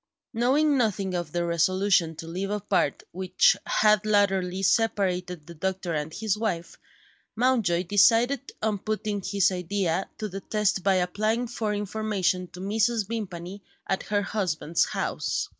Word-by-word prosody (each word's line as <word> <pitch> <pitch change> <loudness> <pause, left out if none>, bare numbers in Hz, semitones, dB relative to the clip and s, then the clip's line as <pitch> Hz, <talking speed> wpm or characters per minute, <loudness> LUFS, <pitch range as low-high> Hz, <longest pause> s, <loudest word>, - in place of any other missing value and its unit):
Knowing 275 +5 +2
nothing 200 -5 0
of 175 -4 -3
the 175 +1 -1
resolution 170 0 +2
to 160 - -8
live 185 +4 -4
apart 205 -8 0
which 185 0 +3
had 215 0 +3
latterly 195 -3 +1
separated 180 -6 0
the 170 - -10
doctor 185 +1 -3
and 150 0 -2
his 215 -1 0
wife, 210 -6 -3 0.6
Mountjoy 225 -8 +2
decided 230 +8 +3
on 215 -2 0
putting 215 -1 -2
his 195 -1 +2
idea 185 0 -1
to 215 - -3
the 195 0 -7
test 210 -1 0
by 195 +1 +3
applying 215 +6 0
for 225 -3 -3
information 205 -3 -1
to 180 - -12
Mrs. 215 +2 0
Vimpany 195 -4 -5 0.2
at 190 - -1
her 205 -1 -1
husband's 170 -6 0
house. - - -2
195 Hz, 140 wpm, -26 LUFS, 180-215 Hz, 0.6 s, which